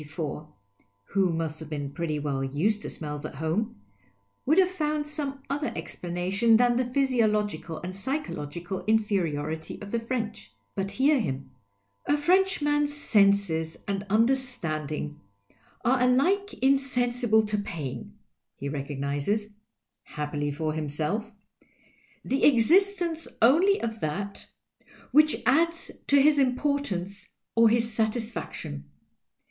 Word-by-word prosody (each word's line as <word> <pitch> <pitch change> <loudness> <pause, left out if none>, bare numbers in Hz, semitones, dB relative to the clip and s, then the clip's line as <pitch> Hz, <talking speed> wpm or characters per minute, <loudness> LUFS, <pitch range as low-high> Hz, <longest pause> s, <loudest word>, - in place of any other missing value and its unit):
(who 195 -3 +2
must 160 -1 -2
have 160 -2 -8
been 145 -2 -4
pretty 160 -1 -2
well 145 -2 -2
\ised 160 +11 0
to - - -5
smells 150 -2 -5
at 155 - -6
home) 160 - -2 0.7
would 310 +5 +4
have 380 -1 +6
fomid 305 -5 -1
some 285 -2 -4
other 290 +2 -2
explanation 180 +7 +1
than 245 0 +3
the 255 +1 +1
physiological 220 - 0
and 185 +1 -5
psychological 190 - -4
inferiority 165 -8 0
of 205 -1 -9
the 235 - 0
French. 225 - -4 0.2
But 195 0 -2
hear 275 +5 +3
him. 135 - -3 0.3
" 100 0 -46
A 290 - +3
Frenchman's 295 -4 +2
senses 200 - +2
and 200 0 -2
understanding 180 - 0 0.6
are 255 +1 +3
alike 345 +12 +3
insensible 245 -4 +2
to 210 0 -1
pain 170 -11 -6 0.2
— - - -57
he 140 - -5
recognizes 145 +8 -2 0.5
(happily 150 0 -3
for 155 +2 -2
him 155 -1 -3
self) 185 +10 -2 0.9
the 270 - 0
exis 350 - +5
tence 330 -2 -3
only 340 - +5
of 225 -1 -4
that 200 +6 -4 0.6
which 305 0 +4
adds 330 +5 +2 0.2
to 280 - +6
his 290 +1 +5
importance 250 -8 -1 0.2
or 230 0 +6
his 230 0 +1
satisfaction. 220 - -3
215 Hz, 125 wpm, -27 LUFS, -, 0.9 s, have